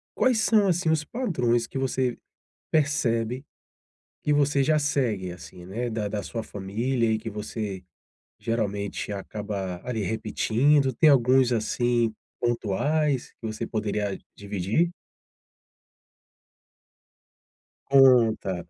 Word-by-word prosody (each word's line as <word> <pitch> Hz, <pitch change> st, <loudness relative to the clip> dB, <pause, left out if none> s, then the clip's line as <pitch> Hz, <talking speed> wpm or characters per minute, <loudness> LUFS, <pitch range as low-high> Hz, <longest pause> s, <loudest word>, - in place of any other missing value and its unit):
Quais 255 Hz, -3 st, +3 dB
são, 215 Hz, -2 st, +4 dB
assim, 175 Hz, -2 st, +1 dB
os 160 Hz, -1 st, +2 dB
padrões 125 Hz, -, 0 dB
que -, -, -6 dB
você 130 Hz, -2 st, -1 dB, 0.5 s
percebe 130 Hz, -5 st, 0 dB, 0.8 s
que 150 Hz, -, +1 dB
você 145 Hz, -1 st, +3 dB
já 155 Hz, +3 st, +3 dB
segue, 120 Hz, -11 st, -1 dB
assim, 90 Hz, 0 st, -11 dB
né, 115 Hz, +6 st, -3 dB
da 110 Hz, -2 st, -2 dB
da 105 Hz, 0 st, -3 dB
sua 115 Hz, +3 st, -5 dB
família 115 Hz, +5 st, -1 dB
e 110 Hz, -, +2 dB
que 110 Hz, +1 st, -6 dB
você 105 Hz, -2 st, -5 dB, 0.6 s
geralmente 105 Hz, -3 st, -2 dB
acaba 100 Hz, -2 st, -5 dB
ali 120 Hz, -4 st, -2 dB
repetindo? 115 Hz, +6 st, +2 dB
tem 155 Hz, -, +5 dB
alguns, 130 Hz, -1 st, +4 dB
assim, 120 Hz, 0 st, +1 dB, 0.3 s
pontuais 130 Hz, +5 st, 0 dB
que 115 Hz, -, -5 dB
você 110 Hz, +1 st, -4 dB
poderia 105 Hz, -3 st, -2 dB, 0.2 s
dividir? 100 Hz, -, -1 dB, 3.0 s
Conta. 115 Hz, -9 st, +4 dB
115 Hz, 110 wpm, -26 LUFS, 105-135 Hz, 3.0 s, tem